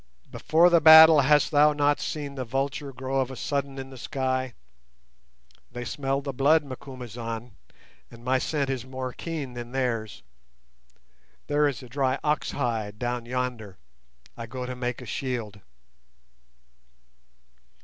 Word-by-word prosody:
Before 170 +3 +3
the 170 -1 +5
battle 160 0 +10
hast 150 +3 +3
thou 150 0 +5
not 145 0 +2
seen 145 -2 -4
the 130 -2 -4
vulture 135 +3 -3
grow 130 +1 -3
of 130 -1 0
a 130 - -7
sudden 140 0 -3
in 135 0 -7
the 130 - -11
sky? 130 -2 -2 1.2
They 120 0 -6
smell 135 +2 -2
the 140 -1 -5
blood, 145 +5 +3
Macumazahn, 120 -3 -7 0.6
and 115 +1 -15
my 130 +1 +2
scent 140 -1 -1
is 130 -3 -3
more 130 -1 -6
keen 155 -6 -5
than 120 0 -8
theirs. 115 - -2 1.2
There 150 0 +2
is 135 -3 -4
a - - -10
dry 130 +1 0
ox 150 0 0
hide 110 -6 -3
down 120 0 -3
yonder; 120 -6 -4 0.6
I 115 - -7
go 125 +2 -6
to 125 0 -5
make 125 0 -4
a - - -10
shield." 115 -5 -4
130 Hz, 145 wpm, -26 LUFS, 120-140 Hz, 1.2 s, battle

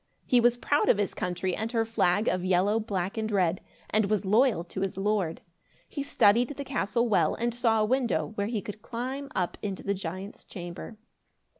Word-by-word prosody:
He 250 - +4
was 240 0 +4
proud 290 +4 +1
of - - +5
his 205 -2 -1
country 180 0 -2
and 220 +1 -3
her 225 -1 +2
flag 210 -2 +1
of 185 - +1
yellow, 190 +4 +2
black 200 -1 -3
and 220 0 -1
red, 180 -3 +1 0.3
and 215 -1 +2
was 210 -1 0
loyal 215 -2 +3
to 185 +2 -6
his 195 -1 -2
lord. 195 -4 0 0.5
He 285 - -5
studied 240 -4 +3
the 285 -1 -6
castle 240 -2 0
well 215 - +2
and 235 0 -1
saw 230 -2 +2
a - - +3
window, 230 - 0
where 205 -1 -2
he 220 -3 -2
could 210 0 -8
climb 260 +5 -5
up 180 -2 -1
into 200 -2 -4
the 200 - 0
giant's 190 +1 -6
chamber. 175 +4 -8
210 Hz, 195 wpm, -28 LUFS, 190-235 Hz, 0.5 s, of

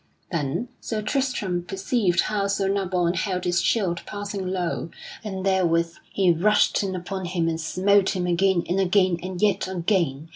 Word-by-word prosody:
Then 165 - -2
Sir 215 -2 -3
Tristram 215 -7 -1
perceived 190 0 +1
how 205 -2 -1
Sir 195 0 0
Nabon 185 -3 +1
held 185 0 -2
his 175 -1 +1
shield 185 -7 +1
passing 205 -2 -4
low, 180 -2 -2 0.3
and 190 -3 -4
therewith 170 -3 +2 0.2
he 185 -3 +3
rushed 205 +6 +3
in 190 -2 -2
upon 185 +1 -4
him 175 -2 -1
and 165 0 -1
smote 195 +4 +2
him 180 -1 -1
again 180 0 +2
and 180 +3 0
again 185 -2 +3
and 185 0 -5
yet 205 -2 +2
again. 170 -5 -1
185 Hz, 160 wpm, -24 LUFS, 175-200 Hz, 0.3 s, he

